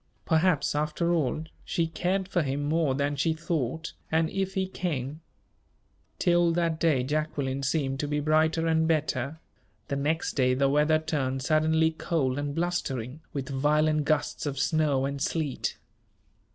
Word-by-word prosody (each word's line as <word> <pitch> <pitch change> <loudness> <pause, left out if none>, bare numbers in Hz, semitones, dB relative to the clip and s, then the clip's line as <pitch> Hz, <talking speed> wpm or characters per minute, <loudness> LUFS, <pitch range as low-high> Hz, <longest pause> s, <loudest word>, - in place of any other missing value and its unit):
Perhaps, 160 -2 +2
after 155 +3 0
all, 155 -2 0 0.2
she 170 - 0
cared 180 +3 -1
for 185 -2 +1
him 140 0 -2
more 150 -2 +1
than 140 +1 0
she 150 +4 +1
thought 160 -1 -3 0.2
and 160 0 +2
if 195 0 -2
he 190 -1 +1
came 155 -5 -3 1.0
Till 175 -2 +3
that 165 -2 0
day 155 -7 +2
Jacqueline 140 -1 -1
seemed 135 -1 0
to 145 - -1
be 150 0 0
brighter 155 +2 +2
and 160 0 +2
better. 150 -2 0 0.5
The 140 - -1
next 155 +4 0
day 125 -2 +2
the 135 +1 +2
weather 150 +2 +4
turned 135 -4 -2
suddenly 160 +2 +3
cold 145 -5 -1
and 145 0 -3
blustering, 155 -6 -2
with 140 -4 -4
violent 150 +2 +2
gusts 150 0 0
of 140 -1 -3
snow 145 -1 +2
and 140 0 -3
sleet. 150 -4 -1
155 Hz, 150 wpm, -28 LUFS, 140-165 Hz, 1.0 s, weather